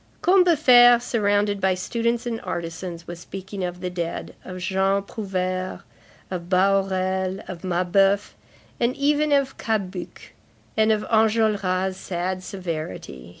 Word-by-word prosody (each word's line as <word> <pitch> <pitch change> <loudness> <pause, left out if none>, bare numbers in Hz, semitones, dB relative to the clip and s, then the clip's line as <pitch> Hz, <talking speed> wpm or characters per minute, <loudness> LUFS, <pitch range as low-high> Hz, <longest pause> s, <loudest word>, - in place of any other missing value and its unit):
Combeferre, 300 -10 +6
surrounded 205 -4 0
by 190 -1 +2
students 235 +6 -1
and 230 -2 -3
artisans, 170 0 -5
was 175 0 -8
speaking 190 +2 -7
of 180 0 -4
the 180 - -2
dead, 170 -2 -4
of 185 -1 -8
Jean 190 +2 +1
Prouvaire, 185 -3 -3 0.5
of 175 -1 -5
Bahorel, 190 0 +1
of 175 -2 -7
Mabeuf, 190 +3 +2 0.5
and 240 +2 +1
even 295 +1 +1
of 275 -1 +1
Cabuc, 195 -5 -4 0.4
and 220 0 +3
of 215 -1 +1
Enjolras' 210 -4 +1
sad 185 0 -3
severity. 155 - -6
190 Hz, 120 wpm, -23 LUFS, 185-220 Hz, 0.5 s, Combeferre